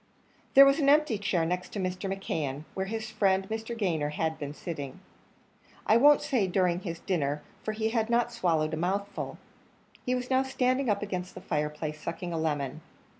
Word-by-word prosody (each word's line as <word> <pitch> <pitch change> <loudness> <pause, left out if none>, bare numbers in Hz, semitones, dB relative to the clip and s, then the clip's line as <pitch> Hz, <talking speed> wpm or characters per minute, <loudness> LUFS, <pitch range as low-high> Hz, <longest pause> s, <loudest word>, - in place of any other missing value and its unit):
There 275 +1 +11
was 275 +3 +4
an 280 -2 +3
empty 295 -7 +4
chair 180 -5 +1
next 180 +2 -3
Mr. 190 -1 -2
McKeon, 150 -7 -3
where 190 0 -2
his 220 +1 -4
friend 195 -2 +2
Mr. 225 +1 -4
Gayner 165 -8 0
had 160 +1 -1
been 145 -1 -4
sitting 145 -3 -6 0.9
I 220 - +5
won't 290 +4 +6
say 235 -8 +1
during 180 -1 +1
his 170 -4 -6
dinner, 150 -6 -1 0.2
for 215 - -3
he 220 +1 0
had 225 -1 0
not 235 0 +2
swallowed 165 -9 +1
a - - -1
mouthful. 195 +4 -2 0.7
He 250 - 0
was 250 +1 -4
now 260 0 +4
standing 260 -1 +1
up 205 0 +1
against 185 -2 -4
the - - -6
fireplace, 150 -1 -3
sucking 170 +1 -4
a 165 - -1
lemon. 150 -2 -2
190 Hz, 180 wpm, -29 LUFS, 160-225 Hz, 0.9 s, There